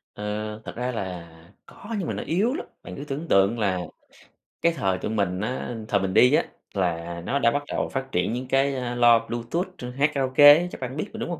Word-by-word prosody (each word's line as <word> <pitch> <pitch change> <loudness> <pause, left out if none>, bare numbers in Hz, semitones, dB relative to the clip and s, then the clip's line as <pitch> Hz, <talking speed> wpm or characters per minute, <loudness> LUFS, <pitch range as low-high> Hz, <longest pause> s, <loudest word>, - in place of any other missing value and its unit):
À, 105 - -7 0.4
thật - - -7
ra 125 +1 -2
là 90 -7 -5 0.4
có 225 +2 -8
nhưng 180 - -3
mà - - -2
nó - - -4
yếu 205 +10 +1
lắm, 345 - -4 0.2
bạn - - -8
cứ 140 - -7
tưởng 150 +3 -5
tượng 100 +2 +3
là 95 -4 +1 0.8
cái 170 - +4
thời 95 - 0
tụi 105 - -4
mình 100 -4 -1
á 125 +2 -3
thời 100 - +2
mình 95 -1 -2
đi 125 +7 +6
á, - - +4 0.3
là 85 -2 -2
nó 140 +7 0
đã 115 -3 +4
bắt 145 +2 -1
đầu - - -2
phát 130 0 -4
triển 90 +5 0
những 125 +1 -4
cái, 135 +1 +2
a, 125 -2 -3
loa 120 -1 +6
Bluetooth 120 +10 -2
chuyên 125 0 -6
hát 140 +4 +1
karaoke 140 +2 +7
ấy 170 +4 +1
chắc - - -9
bạn 130 +2 -5
biết 200 - -3
rồi, 225 - -7
đúng 230 - -3
hông? 170 -3 -4
125 Hz, 240 wpm, -25 LUFS, 100-145 Hz, 0.8 s, karaoke